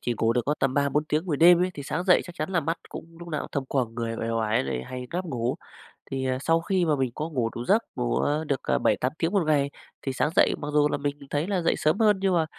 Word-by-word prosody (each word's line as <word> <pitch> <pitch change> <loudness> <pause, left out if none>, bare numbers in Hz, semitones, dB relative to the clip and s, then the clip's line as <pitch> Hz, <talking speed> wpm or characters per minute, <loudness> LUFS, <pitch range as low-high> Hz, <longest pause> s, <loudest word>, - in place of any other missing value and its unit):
chỉ 120 - -1
ngủ 115 0 +3
được 125 - +2
có 145 - +2
tầm 135 -1 +1
3-4 145 +1 +1
tiếng 155 +3 -1
buổi 155 -5 0
đêm 175 +2 +7
ấy, 185 - 0
thì 145 - -6
sáng 180 +5 -3
dậy 180 -1 +5
chắc 175 - -10
chắn 155 +2 -3
là 175 -3 +2
mắt 165 +3 -1
cũng 165 0 -10
lúc 170 0 -9
nào 155 -3 -2
cũng - - -7
thâm 140 - -1
quầng, 125 -4 -1
người 115 -1 -3
uể 115 - -3
oải 110 -6 +1
lại 65 -2 -3
hay 125 0 -6
ngáp 180 +2 -2
ngủ. 125 -7 -2 0.6
Thì, 135 0 -2
ờ, 130 0 0
sau 165 +3 +2
khi 185 +1 +1
mà 155 -2 +2
mình 130 -3 -1
có 155 +2 -3
ngủ 125 -7 -1
đủ 120 - -4
giấc, 220 - +3
ngủ, 120 -1 -1
ờ, 150 +2 0
được, 140 -3 0
ờ, - - +1
7-8 130 - +1
tiếng 165 +1 +1
một 200 -3 +2
ngày 140 -2 +2 0.3
thì 135 - -3
sáng 130 +3 +1
dậy - - +5
mặc 145 - -4
dù 150 0 +4
là - - -1
mình 145 0 -2
thấy 150 +4 -1
là 195 -3 0
dậy 165 - +2
sớm 155 +7 +1
hơn, 210 -3 +4
nhưng 195 -2 +2
mà, 165 -2 +3
150 Hz, 295 wpm, -26 LUFS, 130-170 Hz, 0.6 s, đêm